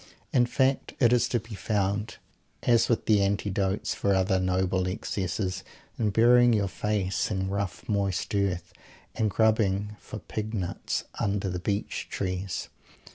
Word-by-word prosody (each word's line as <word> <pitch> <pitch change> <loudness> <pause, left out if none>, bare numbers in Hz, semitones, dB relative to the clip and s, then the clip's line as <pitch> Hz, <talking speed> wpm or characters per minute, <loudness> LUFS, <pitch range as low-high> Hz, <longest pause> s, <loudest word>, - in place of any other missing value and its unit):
In 120 -2 +4
fact, 130 +1 +1
it 120 -2 +5
is 120 - +3
to 120 - +1
be 115 +1 -11
found, 105 +1 -1 0.5
as 120 -2 +4
with 115 - +1
the 105 -2 +4
antidotes 100 0 0
for 100 -1 +1
other 95 0 +2
noble 95 0 +1
excesses, 95 -1 -2 0.4
in 110 -2 +2
burying 120 +3 +5
your 100 -2 +2
face 100 -2 -1
in 95 -2 -1
rough 100 -4 -3
moist 100 0 -1
earth; 100 -3 -1 0.4
and 110 - +1
grubbing 105 -1 +2
for - - -8
pig 110 +1 -5
nuts 90 -4 -2 0.2
under 100 -1 0
the 90 - -3
beech 100 +3 -2
trees. 95 -1 -3
100 Hz, 145 wpm, -27 LUFS, 95-110 Hz, 0.5 s, it